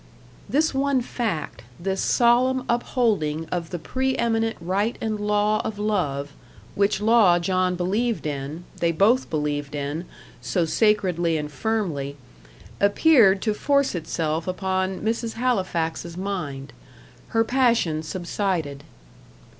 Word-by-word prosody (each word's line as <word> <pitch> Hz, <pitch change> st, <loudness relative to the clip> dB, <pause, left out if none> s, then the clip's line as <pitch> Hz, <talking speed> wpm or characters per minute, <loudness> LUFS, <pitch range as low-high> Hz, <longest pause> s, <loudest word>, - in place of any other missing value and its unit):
This 310 Hz, +2 st, +2 dB
one 270 Hz, -1 st, +1 dB
fact 220 Hz, -, -3 dB, 0.2 s
this 190 Hz, +2 st, -2 dB
solemn 250 Hz, +2 st, +3 dB
upholding 210 Hz, -, 0 dB
of 170 Hz, -2 st, -2 dB
the 180 Hz, -, -4 dB
pre 260 Hz, +10 st, -1 dB
eminent 225 Hz, -1 st, 0 dB
right 195 Hz, +7 st, -1 dB
and 215 Hz, -1 st, -2 dB
law 210 Hz, +1 st, +1 dB
of 215 Hz, -, -4 dB
love, 150 Hz, -10 st, -1 dB, 0.4 s
which 200 Hz, 0 st, +1 dB
law 215 Hz, -5 st, +5 dB
John 185 Hz, +1 st, 0 dB
believed 205 Hz, +6 st, -1 dB
in, 145 Hz, +3 st, -4 dB, 0.2 s
they 170 Hz, -1 st, +2 dB
both 215 Hz, +10 st, +3 dB
believed 145 Hz, -1 st, -2 dB
in, 145 Hz, +4 st, -3 dB, 0.4 s
so 175 Hz, -3 st, 0 dB
sacredly 180 Hz, -4 st, +2 dB
and 150 Hz, -1 st, -4 dB
firmly 150 Hz, -6 st, -2 dB, 0.6 s
appeared 200 Hz, -2 st, +5 dB
to 215 Hz, -, +1 dB
force 280 Hz, +5 st, +1 dB
itself 160 Hz, -1 st, -2 dB
upon 185 Hz, 0 st, -1 dB
Mrs. 225 Hz, +1 st, -1 dB
Halifax's 175 Hz, -8 st, -1 dB
mind. 155 Hz, -9 st, -4 dB, 0.5 s
Her 225 Hz, 0 st, +2 dB
passion 230 Hz, -10 st, +2 dB
subsided. 170 Hz, -4 st, -3 dB
190 Hz, 120 wpm, -24 LUFS, 165-225 Hz, 0.6 s, law